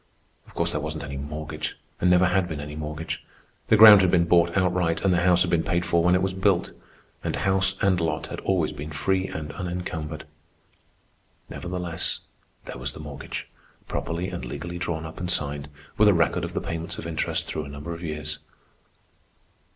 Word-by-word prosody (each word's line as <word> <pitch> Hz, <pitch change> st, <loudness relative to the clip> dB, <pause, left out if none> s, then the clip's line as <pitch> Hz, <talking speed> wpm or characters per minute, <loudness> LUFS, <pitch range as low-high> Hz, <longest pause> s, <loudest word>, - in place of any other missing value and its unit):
Of -, -, -18 dB
course -, -, 0 dB
there 75 Hz, -, -2 dB
wasn't 75 Hz, 0 st, -4 dB
any 70 Hz, -1 st, -6 dB
mortgage, 75 Hz, +2 st, -5 dB, 0.2 s
and 90 Hz, -, +3 dB
never 90 Hz, +1 st, +5 dB
had 90 Hz, 0 st, +2 dB
been 80 Hz, -3 st, -5 dB
any 75 Hz, 0 st, -6 dB
mortgage. 75 Hz, +1 st, -5 dB, 0.4 s
The 110 Hz, -, +5 dB
ground 105 Hz, -2 st, +11 dB
had 95 Hz, -, +3 dB
been 85 Hz, -1 st, +4 dB
bought 85 Hz, +1 st, +3 dB
outright, 90 Hz, -3 st, +1 dB
and 95 Hz, -, +4 dB
the 85 Hz, -, +2 dB
house 90 Hz, 0 st, +5 dB
had 90 Hz, -, -2 dB
been 85 Hz, -2 st, +3 dB
paid 85 Hz, 0 st, 0 dB
for 85 Hz, 0 st, +3 dB
when 90 Hz, +1 st, +5 dB
it 90 Hz, -, +2 dB
was 95 Hz, -1 st, 0 dB
built. 95 Hz, -1 st, +1 dB, 0.5 s
And -, -, -1 dB
house 95 Hz, 0 st, +1 dB
and 95 Hz, -3 st, +3 dB
lot 80 Hz, -, -1 dB
had -, -, -6 dB
always 90 Hz, -5 st, +1 dB
been 75 Hz, 0 st, -7 dB
free 95 Hz, +6 st, 0 dB
and 75 Hz, -2 st, -5 dB
unencumbered. 90 Hz, -4 st, -4 dB, 1.3 s
Nevertheless 90 Hz, -2 st, -3 dB, 0.4 s
there -, -, -7 dB
was 65 Hz, +1 st, -3 dB
the -, -, -10 dB
mortgage, 75 Hz, -2 st, -6 dB, 0.4 s
properly 85 Hz, +3 st, -2 dB
and -, -, -5 dB
legally 75 Hz, +8 st, -5 dB
drawn 85 Hz, -2 st, -3 dB
up 80 Hz, 0 st, -8 dB
and 90 Hz, 0 st, -3 dB
signed, 75 Hz, -3 st, -1 dB, 0.3 s
with 105 Hz, -, +7 dB
a 100 Hz, -, +6 dB
record 85 Hz, -1 st, +2 dB
of -, -, -4 dB
the -, -, 0 dB
payments 85 Hz, 0 st, -4 dB
of -, -, -6 dB
interest -, -, -1 dB
through 75 Hz, -, -4 dB
a -, -, -9 dB
number 70 Hz, +4 st, -6 dB
of 85 Hz, -, -8 dB
years. 75 Hz, -2 st, -4 dB
85 Hz, 195 wpm, -25 LUFS, 75-90 Hz, 1.3 s, ground